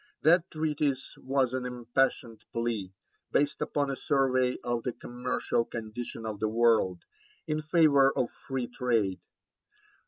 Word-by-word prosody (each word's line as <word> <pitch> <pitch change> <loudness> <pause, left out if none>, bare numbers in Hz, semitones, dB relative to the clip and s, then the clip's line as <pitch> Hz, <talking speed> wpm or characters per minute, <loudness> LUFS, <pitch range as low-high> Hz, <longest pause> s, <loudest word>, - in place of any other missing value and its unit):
That 175 +3 +5
treatise 150 -4 -1
was 130 -2 +1
an 130 -1 -1
impassioned 125 -1 -1
plea, 115 -5 -2 0.4
based 145 0 +1
upon 145 -2 0
a - - -2
survey 130 -3 +1
of 120 -1 -1
the 125 +1 -3
commercial 125 -1 -2
condition 115 0 -6
of 110 -2 -4
the 110 - 0
world, 110 -5 +3 0.4
in 155 -1 -1
favour 150 -4 +5
of 125 - 0
free 130 -2 -4
trade. 115 -6 0
125 Hz, 130 wpm, -29 LUFS, 115-140 Hz, 0.4 s, That